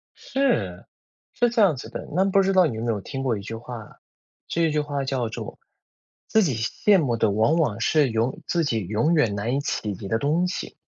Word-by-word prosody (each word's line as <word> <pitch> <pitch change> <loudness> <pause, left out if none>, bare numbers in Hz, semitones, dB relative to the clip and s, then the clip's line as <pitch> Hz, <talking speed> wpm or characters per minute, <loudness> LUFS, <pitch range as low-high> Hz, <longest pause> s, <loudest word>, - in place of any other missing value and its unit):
是， 110 - -1 0.5
是 240 0 +2
这 235 -1 +1
样 190 -7 +5
子 125 - -8
的。 - - -7
那 190 +2 +3
不 195 0 +4
知 195 0 +1
道 185 -1 +6
你 125 - -2
有 110 - -4
没 120 - +1
有 105 -3 -3
听 135 +6 -5
过 120 -5 0
一 - - -6
句 110 +3 -6
话， 115 -2 -9 0.5
这 170 - -1
一 160 - +2
句 150 - +1
话 145 -2 -2
叫 130 -3 -1
做： 115 - -7 0.7
“自 220 - +3
己 145 -9 0
羡 185 - +2
慕 125 -7 0
的， 110 -2 +2
往 110 +9 +3
往 135 -11 +1
是 145 +4 +3
永 115 +3 -1
自 170 -1 +1
己 140 -7 0
永 110 - +1
远 120 -11 +2
难 110 +5 -1
以 - - +1
企 105 -6 -2
及 100 - -8
的 110 +3 0
东 160 +7 +1
西， 180 - -5
135 Hz, 245 characters per minute, -24 LUFS, 110-170 Hz, 0.7 s, 道